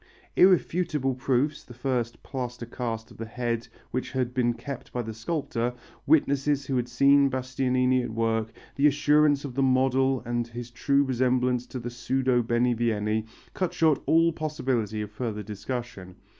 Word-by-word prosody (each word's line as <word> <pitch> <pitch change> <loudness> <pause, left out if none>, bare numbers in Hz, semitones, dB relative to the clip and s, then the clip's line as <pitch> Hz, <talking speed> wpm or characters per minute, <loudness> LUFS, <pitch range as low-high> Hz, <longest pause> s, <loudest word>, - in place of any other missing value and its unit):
Irrefutable 170 -6 +3
proofs 130 +3 0
the 120 - -13
first 120 -2 -2
plaster 125 -3 -5
cast 115 -2 -5
of - - -14
the 115 - -6
head 115 0 -3 0.2
which 130 +2 -3
had 125 -2 -1
been 120 -2 +1
kept 140 0 -7
by 125 - -2
the 110 0 -6
sculptor, 120 -1 -2 0.3
witnesses 140 -1 +2
who 135 - -2
had 125 -1 0
seen 140 +3 +5
Bastianini 130 0 +1
at 120 - -4
work, 115 0 -1 0.3
the 140 +2 +5
assurance 145 0 +3
of 135 - -6
the 135 - 0
model 130 0 +2
and 120 0 -1
his 120 +1 -8
true 140 +3 +2
resemblance 125 -1 +1
to - - -6
the 120 0 -5
pseudo 125 +1 +1
Benivieni 115 -2 0 0.3
cut 185 -2 -2
short 155 -4 +3
all 165 +1 +4
possibility 130 -9 -2
of 105 - -8
further 105 -1 -4
discussion. 105 -3 -6
125 Hz, 155 wpm, -27 LUFS, 120-140 Hz, 0.3 s, seen